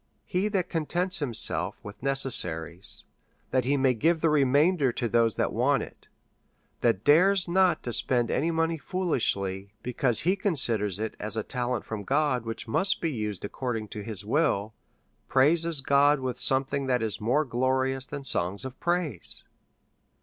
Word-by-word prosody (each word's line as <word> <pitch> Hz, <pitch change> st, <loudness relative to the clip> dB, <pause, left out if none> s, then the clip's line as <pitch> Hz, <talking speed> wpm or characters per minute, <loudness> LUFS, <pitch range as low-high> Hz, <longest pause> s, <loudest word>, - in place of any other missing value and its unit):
He 185 Hz, +3 st, -1 dB
that 195 Hz, -4 st, -1 dB
contents 175 Hz, +4 st, 0 dB
himself 125 Hz, -7 st, -1 dB
with 105 Hz, 0 st, -10 dB
necessaries, 95 Hz, -, -2 dB, 0.5 s
that 130 Hz, -1 st, +1 dB
he 140 Hz, +2 st, +2 dB
may 130 Hz, -1 st, +3 dB
give 160 Hz, +8 st, +1 dB
the 160 Hz, 0 st, +2 dB
re 150 Hz, -2 st, +4 dB
mainder 145 Hz, +1 st, +3 dB
to 120 Hz, 0 st, -2 dB
those 115 Hz, -1 st, +2 dB
that -, -, -1 dB
want -, -, +2 dB
it, -, -, -13 dB, 0.7 s
that 95 Hz, -, +1 dB
dares 180 Hz, +5 st, +4 dB
not 180 Hz, -2 st, +2 dB
to 120 Hz, -, -4 dB
spend 120 Hz, -1 st, +1 dB
any 160 Hz, +5 st, 0 dB
money 165 Hz, 0 st, 0 dB
foolishly, 100 Hz, -, -1 dB
because 125 Hz, -1 st, +1 dB
he 185 Hz, +4 st, +2 dB
considers 120 Hz, -, +1 dB
it 110 Hz, 0 st, -4 dB
as 110 Hz, +1 st, -5 dB
a 110 Hz, -, -1 dB
ta 125 Hz, -1 st, -3 dB
lent 125 Hz, -, -2 dB
from 110 Hz, -2 st, -5 dB
God, 135 Hz, 0 st, 0 dB
which 115 Hz, +1 st, -5 dB
must 190 Hz, -, +1 dB
be 165 Hz, -, -1 dB
used 105 Hz, -6 st, -4 dB
according 115 Hz, -1 st, -4 dB
to 105 Hz, -, -7 dB
his 105 Hz, -2 st, -5 dB
will, 110 Hz, -5 st, 0 dB, 0.5 s
praises 160 Hz, +3 st, +2 dB
God 140 Hz, +2 st, +4 dB
with 130 Hz, -1 st, -4 dB
something 135 Hz, +1 st, +2 dB
that 125 Hz, -3 st, +1 dB
is 110 Hz, -2 st, -3 dB
more 130 Hz, +8 st, +1 dB
glorious 130 Hz, +1 st, 0 dB
than 140 Hz, -, -6 dB
songs 100 Hz, -3 st, +1 dB
of 130 Hz, -1 st, -8 dB
praise. 170 Hz, -, -2 dB
130 Hz, 165 wpm, -27 LUFS, 115-160 Hz, 0.7 s, re